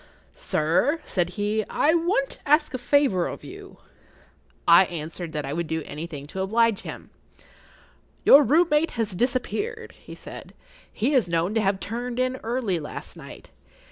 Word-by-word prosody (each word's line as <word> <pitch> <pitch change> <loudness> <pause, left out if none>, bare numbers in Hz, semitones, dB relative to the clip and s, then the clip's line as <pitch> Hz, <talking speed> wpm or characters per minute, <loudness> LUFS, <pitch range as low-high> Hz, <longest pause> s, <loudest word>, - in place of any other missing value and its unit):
"Sir," 170 - +1
said 175 -2 -1
he, 210 +1 0
"I 310 - +2
want 335 -5 +1
to - - -11
ask 300 -1 +3
a 255 - -3
favour 245 -8 +2
of - - -7
you." 390 +1 -11 0.9
I 170 +2 +8
answered 165 0 -6
that 150 -2 -3
I 140 - -4
would 170 +1 -2
do 160 0 -2
anything 150 -2 -7
to 190 +6 -5
oblige 225 +2 +2
him. - - -9 1.1
"Your 285 +2 +9
room 315 +8 +4
mate 300 +2 +2
has 225 -2 0
disappeared,"[Pg 270 - -2
30] - - -23
he - - -10
said. - - -11 0.4
"He 250 +8 -1
is 245 -10 +2
known 170 +4 0
to 220 - +2
have 195 -1 +1
turned 240 +3 -5
in 255 0 0
early 230 -7 -2
last 150 - -8
night. - - -12
220 Hz, 170 wpm, -25 LUFS, 175-275 Hz, 1.1 s, Your